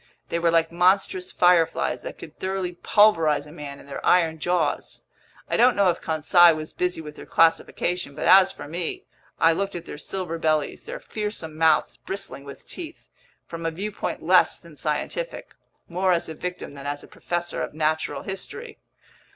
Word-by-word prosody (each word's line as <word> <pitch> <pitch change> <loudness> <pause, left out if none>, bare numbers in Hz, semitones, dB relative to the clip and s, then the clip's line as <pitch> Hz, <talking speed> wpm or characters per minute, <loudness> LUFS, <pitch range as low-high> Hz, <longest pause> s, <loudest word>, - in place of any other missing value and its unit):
They 170 - -1
were 170 0 +3
like 165 0 +2
monstrous 185 +1 +2
fireflies 175 -2 +3
that - - -7
could - - -12
thoroughly 190 -1 -2
pulverize 170 -5 +3
a 150 - -12
man 145 -3 -8
in - - -14
their 140 -1 -7
iron 165 -3 +3
jaws! 175 -2 -1 0.4
I - - 0
don't 250 +1 +5
know 200 -3 +4
if 170 - -7
Conseil 165 +2 +5
was 155 0 -7
busy 180 -2 -1
with 150 -1 -9
their - - -11
classification, 165 -1 +1
but - - -4
as 190 0 +7
for - - -9
me, 170 +2 -4 0.3
I 165 0 +5
looked 195 +3 -2
at 170 -1 -6
their 150 - -8
silver 175 -1 -4
bellies, 155 -2 0
their - - -6
fearsome 210 - -5
mouths 160 -1 +2
bristling 195 -7 -6
with 140 - -11
teeth, 335 -2 -9 0.3
from 165 0 -7
a 165 - +1
viewpoint 200 +6 -4
less - - +4
than - - -15
scientific—more 190 - -3
as 170 - +1
a 160 - -5
victim 180 -1 -6
than 140 0 -8
as 145 0 -4
a - - -13
professor 175 0 -3
of - - -5
natural 155 -2 -1
history. 310 - -7
170 Hz, 175 wpm, -24 LUFS, 155-190 Hz, 0.4 s, as